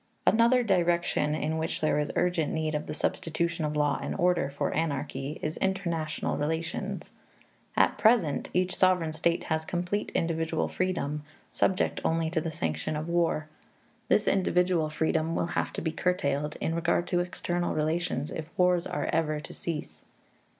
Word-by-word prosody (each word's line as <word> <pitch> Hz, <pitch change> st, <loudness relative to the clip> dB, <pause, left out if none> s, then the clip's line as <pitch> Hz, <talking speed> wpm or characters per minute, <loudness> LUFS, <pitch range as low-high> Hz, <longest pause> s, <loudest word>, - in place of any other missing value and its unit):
Another 235 Hz, +3 st, +5 dB
direction 175 Hz, -6 st, +2 dB
in 160 Hz, +1 st, -1 dB
which 160 Hz, -, -2 dB
there 155 Hz, -1 st, +2 dB
is 150 Hz, -, -1 dB
urgent 175 Hz, -4 st, +1 dB
need 160 Hz, -1 st, -1 dB
of 150 Hz, 0 st, -2 dB
the -, -, -3 dB
substitution 170 Hz, +1 st, -1 dB
of 150 Hz, 0 st, -2 dB
law 145 Hz, -1 st, +2 dB
and -, -, -3 dB
order 175 Hz, -5 st, +2 dB
for 140 Hz, -, -2 dB
anarchy 145 Hz, -2 st, -2 dB
is 155 Hz, +1 st, -2 dB
international 170 Hz, -5 st, -1 dB
relations. 160 Hz, +3 st, -3 dB, 0.7 s
At -, -, +3 dB
present, 215 Hz, -, +3 dB
each 180 Hz, +1 st, +1 dB
sovereign 180 Hz, -4 st, +3 dB
state 170 Hz, +2 st, +1 dB
has 160 Hz, -1 st, -1 dB
complete 180 Hz, +5 st, -2 dB
individual 165 Hz, -1 st, 0 dB
freedom, 160 Hz, -5 st, -1 dB, 0.3 s
subject 190 Hz, -, +1 dB
only 160 Hz, 0 st, +1 dB
to 165 Hz, -2 st, +1 dB
the 165 Hz, -, -2 dB
sanction 80 Hz, -, -2 dB
of 155 Hz, +2 st, -3 dB
war. 170 Hz, -3 st, +1 dB, 0.6 s
This 210 Hz, -, +3 dB
individual 180 Hz, -4 st, +2 dB
freedom 160 Hz, +1 st, 0 dB
will -, -, +1 dB
have -, -, 0 dB
to -, -, -3 dB
be 160 Hz, -, 0 dB
curtailed 150 Hz, -4 st, 0 dB
in 165 Hz, -, -2 dB
regard 170 Hz, +1 st, +1 dB
to 175 Hz, -, +2 dB
external 175 Hz, 0 st, -2 dB
relations 155 Hz, -2 st, -1 dB
if 160 Hz, 0 st, -5 dB
wars 180 Hz, -1 st, +3 dB
are 145 Hz, -, -2 dB
ever 155 Hz, -2 st, +1 dB
to -, -, -9 dB
cease. 150 Hz, -, -5 dB
165 Hz, 160 wpm, -28 LUFS, 155-175 Hz, 0.7 s, Another